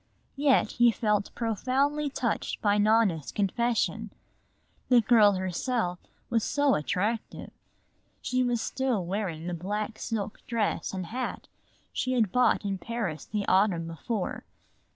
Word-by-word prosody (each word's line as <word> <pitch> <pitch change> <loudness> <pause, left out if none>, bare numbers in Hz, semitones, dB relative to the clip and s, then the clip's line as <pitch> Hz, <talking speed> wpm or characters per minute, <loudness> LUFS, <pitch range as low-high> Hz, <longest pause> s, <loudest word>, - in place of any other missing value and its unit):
Yet 280 -1 +3
he 240 0 +5
felt 210 -3 0
profoundly 270 +6 0
touched 245 -4 -2
by 205 -1 +2
Nona's 205 -8 +2
confession. 230 +4 0 0.8
The 250 -2 +7
girl 215 -2 +5
herself 185 +1 -1 0.3
was 230 -2 +1
so 285 -2 +2
attractive! 210 +9 -2 0.7
She 255 0 0
was 245 -2 +1
still 255 -9 -1
wearing 180 -4 -3
the 180 - -3
black 210 +5 -3
silk 215 -2 -3
dress 230 -3 -1
and 185 -2 -4
hat 250 +8 -4 0.5
she 255 - -1
had 225 -7 +2
bought 250 -3 +3
in 195 -1 -2
Paris 215 -10 -4
the 210 -2 -3
autumn 185 -3 +3
before. 180 +5 -4
215 Hz, 130 wpm, -28 LUFS, 190-245 Hz, 0.8 s, The